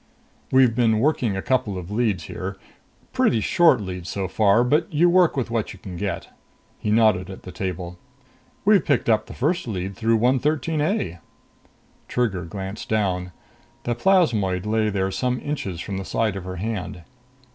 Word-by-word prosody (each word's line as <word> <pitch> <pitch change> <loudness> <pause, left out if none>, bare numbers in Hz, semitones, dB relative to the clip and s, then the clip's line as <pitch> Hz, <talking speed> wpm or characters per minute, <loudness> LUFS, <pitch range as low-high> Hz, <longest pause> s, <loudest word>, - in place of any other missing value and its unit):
"We've 130 -3 +5
been 115 -2 +3
working 120 -5 +1
a 95 - -4
couple 125 -7 0
of 90 +1 -7
leads 105 -6 0
here. 95 +4 -6 0.6
Pretty 115 - +2
short 155 +5 +4
leads 90 -3 -6
so 95 -2 -2
far, 105 +4 +3
but 150 +6 +1
you 170 +3 +4
work 180 -4 +4
with 120 -3 -2
what 115 -2 -1
you - - -12
can 95 -1 -9
get." 95 0 -4 0.5
He - - -3
nodded 105 -4 +3
at 95 - -9
the 90 - -8
table. 90 -2 -5 0.7
"We 210 -1 +6
picked 140 -7 0
up 110 - +2
the - - -9
first 155 +3 0
lead 95 -2 -4
through 115 0 +2
113 145 +6 +1
A." 150 - -1 0.9
Trigger 100 -8 -1
glanced 95 +4 -6
down. 95 -4 0 0.5
The 120 - 0
plasmoid 115 - +2
lay 110 0 +1
there 95 -1 -1
some 125 +4 -1
inches 100 - -4
from 95 +2 -4
the - - -4
side 110 -1 0
of 95 -2 -6
her 90 0 -5
hand. 95 -2 -4
110 Hz, 170 wpm, -23 LUFS, 95-125 Hz, 0.9 s, We